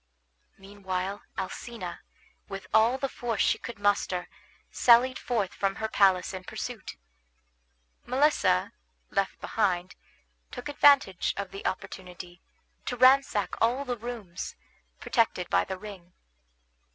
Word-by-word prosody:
Meanwhile 195 Hz, 0 st, -4 dB, 0.2 s
Alcina, 190 Hz, -1 st, -6 dB, 0.5 s
with 195 Hz, -1 st, -6 dB
all 225 Hz, +4 st, +5 dB
the 275 Hz, -, -1 dB
force 235 Hz, -5 st, -3 dB
she -, -, +2 dB
could 235 Hz, -, -7 dB
muster, 200 Hz, -3 st, 0 dB, 0.4 s
sallied 250 Hz, +2 st, +5 dB
forth 215 Hz, -7 st, -1 dB
from 195 Hz, -1 st, -1 dB
her 220 Hz, -, -2 dB
palace 190 Hz, -3 st, +3 dB
in 185 Hz, -1 st, -6 dB
pursuit. 220 Hz, -, -6 dB, 1.1 s
Melissa, 260 Hz, -, +2 dB, 0.4 s
left 195 Hz, -1 st, -1 dB
behind, 185 Hz, -4 st, 0 dB, 0.6 s
took 250 Hz, +2 st, -7 dB
advantage 280 Hz, -10 st, +4 dB
of 200 Hz, -1 st, -4 dB
the 195 Hz, -, -8 dB
opportunity 180 Hz, -1 st, -7 dB, 0.5 s
to 245 Hz, -, -2 dB
ransack 255 Hz, -4 st, +4 dB
all 245 Hz, +5 st, +2 dB
the 250 Hz, -2 st, -2 dB
rooms, 225 Hz, -6 st, -6 dB, 0.4 s
protected 215 Hz, -6 st, 0 dB
by -, -, +3 dB
the 190 Hz, -, -5 dB
ring. 185 Hz, -3 st, -11 dB
205 Hz, 115 wpm, -28 LUFS, 185-245 Hz, 1.1 s, all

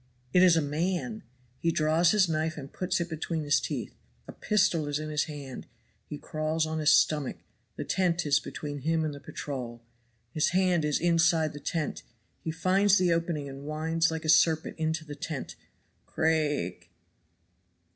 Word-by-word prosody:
It 180 Hz, -, +6 dB
is 180 Hz, -3 st, +6 dB
a 160 Hz, -, +2 dB
man! 180 Hz, +9 st, -2 dB, 0.4 s
He 165 Hz, -, +1 dB
draws 160 Hz, +2 st, +3 dB
his 205 Hz, -2 st, +4 dB
knife 160 Hz, 0 st, -1 dB
and 140 Hz, -2 st, -9 dB
puts 185 Hz, 0 st, -1 dB
it 170 Hz, -, -2 dB
between 160 Hz, -1 st, -3 dB
his 145 Hz, 0 st, +3 dB
teeth. -, -, -4 dB, 0.3 s
A -, -, -7 dB
pistol 190 Hz, -7 st, +1 dB
is 145 Hz, 0 st, -1 dB
in 155 Hz, 0 st, -5 dB
his 150 Hz, -1 st, +1 dB
hand 140 Hz, -4 st, -8 dB, 0.4 s
he 150 Hz, -, -5 dB
crawls 155 Hz, +2 st, -1 dB
on 160 Hz, 0 st, -3 dB
his 150 Hz, -1 st, +3 dB
stomach 150 Hz, -3 st, +3 dB, 0.4 s
the -, -, -4 dB
tent 175 Hz, -2 st, 0 dB
is 145 Hz, -1 st, +3 dB
between 145 Hz, -1 st, -6 dB
him 160 Hz, +3 st, 0 dB
and 150 Hz, -, -3 dB
the 140 Hz, -, -9 dB
patrol. 125 Hz, -5 st, -6 dB, 0.5 s
His 155 Hz, -, +2 dB
hand 180 Hz, -3 st, +2 dB
is 150 Hz, -1 st, +1 dB
inside 165 Hz, -2 st, +3 dB
the 145 Hz, -, -8 dB
tent 155 Hz, +1 st, -3 dB, 0.4 s
he -, -, -3 dB
finds 185 Hz, +5 st, +3 dB
the 180 Hz, -2 st, +3 dB
opening 165 Hz, -3 st, -2 dB
and 135 Hz, +1 st, -9 dB
winds 160 Hz, +2 st, 0 dB
like 160 Hz, 0 st, -4 dB
a -, -, -1 dB
serpent 160 Hz, 0 st, +4 dB
into 160 Hz, 0 st, -1 dB
the 145 Hz, -, -7 dB
tent. 145 Hz, -2 st, -6 dB, 0.5 s
Craake! 150 Hz, -, 0 dB
160 Hz, 175 wpm, -28 LUFS, 150-170 Hz, 0.5 s, It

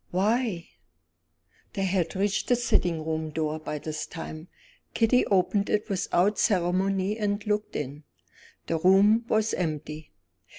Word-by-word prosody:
"Why?" 205 Hz, -1 st, 0 dB, 1.1 s
They 195 Hz, -, -2 dB
had 185 Hz, -2 st, 0 dB
reached 195 Hz, +1 st, 0 dB
the 245 Hz, -, +4 dB
sitting 175 Hz, -9 st, 0 dB
room 160 Hz, 0 st, -2 dB
door 155 Hz, 0 st, -2 dB
by 150 Hz, -1 st, -5 dB
this 155 Hz, +1 st, -5 dB
time. 160 Hz, -1 st, -8 dB, 0.5 s
Kitty 230 Hz, +2 st, +3 dB
opened 200 Hz, +1 st, +1 dB
it 210 Hz, +1 st, 0 dB
without 195 Hz, +1 st, +1 dB
ceremony 195 Hz, +2 st, +1 dB
and 205 Hz, 0 st, -1 dB
looked 210 Hz, 0 st, -2 dB
in. 145 Hz, +1 st, -5 dB, 0.6 s
The 165 Hz, -, -1 dB
room 200 Hz, +6 st, +5 dB
was 220 Hz, -1 st, +1 dB
empty. 155 Hz, -2 st, -4 dB
185 Hz, 130 wpm, -27 LUFS, 160-210 Hz, 1.1 s, room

